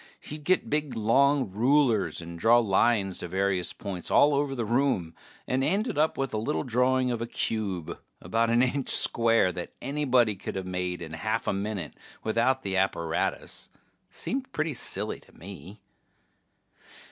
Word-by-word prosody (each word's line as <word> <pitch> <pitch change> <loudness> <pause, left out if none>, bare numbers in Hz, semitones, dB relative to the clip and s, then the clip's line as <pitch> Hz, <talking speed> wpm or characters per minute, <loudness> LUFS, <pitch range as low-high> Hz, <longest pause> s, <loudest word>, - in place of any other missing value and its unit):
He'd 150 0 -9
get 185 +3 +2
big 150 -2 -1
long 130 +2 +2
rulers 120 -2 +2
and 85 0 -9
draw 115 +5 +5
lines 100 -3 +2
to - - -5
various 95 0 0
points 95 -4 -6
all 145 0 +5
over 140 -1 0
the 120 -3 -2
room, 115 -8 0 0.3
and 130 +1 0
end 200 - 0
up 155 +2 +1
with 135 -1 -2
a 110 - 0
little 130 +8 -1
drawing 125 0 +1
of 115 -1 -3
a 115 - -3
cube 100 -8 -3 0.2
about 115 +1 0
an 120 +2 +4
inch 130 +1 -1
square 115 -5 +4
that 90 -1 -7
anybody 130 -5 +2
coulda 95 0 -5
made 90 -1 -3
in 80 -1 -8
a - - -5
half 110 +5 -2
a - - 0
minute 100 -5 -4 0.3
without 115 +4 +2
all - - -28
the 95 -1 -2
apparatus. 85 -4 -1 0.4
Seemed 265 +1 -3
pretty 155 0 -1
silly 120 - -3
to - - -22
me. 100 +3 -11
115 Hz, 165 wpm, -27 LUFS, 95-135 Hz, 0.4 s, draw